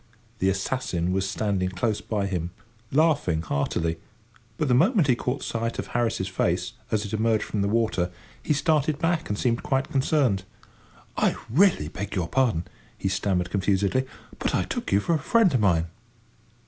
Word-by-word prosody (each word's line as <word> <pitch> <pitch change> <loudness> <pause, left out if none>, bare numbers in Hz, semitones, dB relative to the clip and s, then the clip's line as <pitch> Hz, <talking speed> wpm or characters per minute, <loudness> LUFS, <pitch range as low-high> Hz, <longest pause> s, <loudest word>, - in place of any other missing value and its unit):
The 95 - +3
assassin 95 -3 -1
was 95 0 0
standing 95 -3 0
close 100 +4 -1
by 105 -3 -2
him, 90 -3 -2 0.4
laughing 140 - +2
heartily, 80 +2 -1 0.6
but 155 - 0
the 125 - +3
moment 185 - +4
he 125 - +4
caught 125 +3 -3
sight 115 0 -2
of - - -4
Harris's 115 -5 0
face, 95 - -1 0.2
as 110 -1 0
it 100 - -7
emerged 110 0 +2
from 105 - -2
the 100 - +1
water, 105 -5 +1 0.3
he - - -3
started 150 0 +2
back 165 +1 0
and 105 - -1
seemed 115 0 +1
quite 135 0 -1
concerned. 135 -7 +2 0.8
"I - - +2 0.2
really 165 - +4
beg 95 +5 -5
your 90 -4 0
pardon," 120 -10 +1 0.3
he 95 - -1
stammered 90 -2 0
confusedly, 100 +6 +1 0.3
"but - - 0
I - - +2
took - - -4
you 100 - +4
for 170 - 0
a 160 - +2
friend 205 +2 +3
of 125 - +3
mine!" 85 -6 +3
110 Hz, 175 wpm, -25 LUFS, 95-135 Hz, 0.8 s, moment